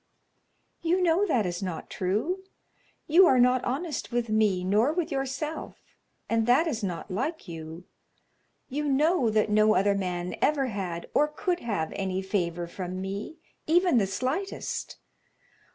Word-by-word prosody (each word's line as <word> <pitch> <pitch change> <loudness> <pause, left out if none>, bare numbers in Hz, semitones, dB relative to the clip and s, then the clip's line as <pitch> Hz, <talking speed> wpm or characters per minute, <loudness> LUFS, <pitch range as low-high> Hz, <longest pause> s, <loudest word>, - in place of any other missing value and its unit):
"You 345 +2 +2
know 360 +3 +3
that 230 - +2
is 175 +1 -3
not 180 -4 -5
true. 220 - -1 0.6
You 345 +4 +6
are 260 - +5
not 250 0 +4
honest 290 +4 -3
with 240 -1 -1
me 210 -4 +2
nor 210 +9 +3
with 335 0 -2
yourself, 275 +3 -3 0.5
and 230 0 +1
that 255 +7 +5
is 235 -9 -2
not 180 0 -4
like 265 - -3
you. 165 +1 -8 0.8
You 295 +3 -3
know 290 -1 +3
that 215 -1 +1
no 215 +1 +4
other 200 +1 +3
man 180 -2 -3
ever 290 -2 +2
had, 180 -4 -4
or 300 - +4
could 350 +4 -2
have, 205 - -2
any 190 -1 -2
favor 175 -3 -1
from 180 +1 -6
me, 200 - -5 0.3
even 345 -4 +4
the 195 - +1
slightest. 260 - -3
225 Hz, 150 wpm, -27 LUFS, 190-300 Hz, 0.8 s, You